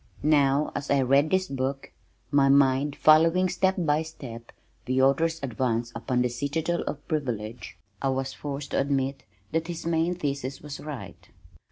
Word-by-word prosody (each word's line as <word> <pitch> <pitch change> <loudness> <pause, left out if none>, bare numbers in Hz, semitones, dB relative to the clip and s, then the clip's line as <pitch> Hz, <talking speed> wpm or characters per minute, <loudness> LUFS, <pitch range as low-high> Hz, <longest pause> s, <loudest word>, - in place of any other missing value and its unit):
Now 145 -1 +3
as 145 0 -5
I 140 -1 +3
read 140 +4 +3
this 185 +1 +1
book, 135 -1 -3 0.4
my 140 -1 +4
mind 140 +1 +3
following 165 +4 +5
step 190 +2 +1
by 155 -3 +2
step 120 -7 -9 0.3
the 130 +1 0
author's 160 +5 +3
advance 120 -2 -1
upon 125 +1 0
the - - +2
citadel 150 +7 -2
of 145 - -5
privilege, 120 -7 -4 0.2
I 135 - +1
was 135 0 -2
forced 145 0 -6
to - - +1
admit 135 -1 0 0.3
that 160 +1 -1
his 170 -2 -6
main 170 +1 +1
thesis 140 -5 -3
was 150 0 -8
right. 150 -4 -9
140 Hz, 160 wpm, -26 LUFS, 130-155 Hz, 0.4 s, following